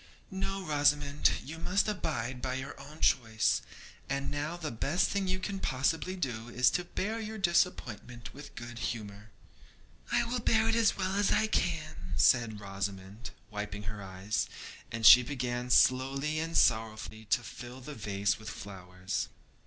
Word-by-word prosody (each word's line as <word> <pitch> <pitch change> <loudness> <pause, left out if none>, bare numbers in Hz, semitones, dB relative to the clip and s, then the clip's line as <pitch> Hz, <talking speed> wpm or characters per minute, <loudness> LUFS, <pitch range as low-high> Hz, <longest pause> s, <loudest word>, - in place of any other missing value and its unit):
'No, 195 0 -3
Rosamond; 145 -1 +3 0.2
you 160 +4 -7
must 195 +5 +1
abide 130 - -2
by 130 0 -2
your 135 +2 -5
own 150 +3 -12
choice, 110 -3 +3 0.5
and 140 0 -1
now 150 +4 -3
the 160 -3 -4
best 140 +10 +1
thing 200 -1 0
you 185 0 +1
can 195 +1 -4
possibly 160 +6 0
do 120 -9 -3
is 125 +2 +3
to 180 - 0
bear 210 +5 -2
your 220 0 -5
disappointment 125 - 0
with 145 +1 -11
good 120 0 -7
humour.' 105 -3 -5 0.8
'I - - +3
will 240 +1 -2
bear 225 -1 +3
it 225 - +2
as 230 -3 +3
well 190 -1 -1
as 200 0 +2
I 220 - +3
can,' 155 - -2
said 115 -2 +4
Rosamond, 100 +2 -5 0.2
wiping 105 0 -5
her 105 0 -6
eyes; 95 +2 -2 0.4
and 115 0 -2
she 120 +3 +11
began 125 -1 -3
slowly 135 +5 +3
and 165 +1 -1
sorrowfully 110 -1 +1
to 115 +4 +2
fill 120 +3 -9
the 140 +4 -8
vase 100 -4 -1
with 110 - -7
flowers. 90 -2 -5
130 Hz, 160 wpm, -31 LUFS, 110-165 Hz, 0.8 s, she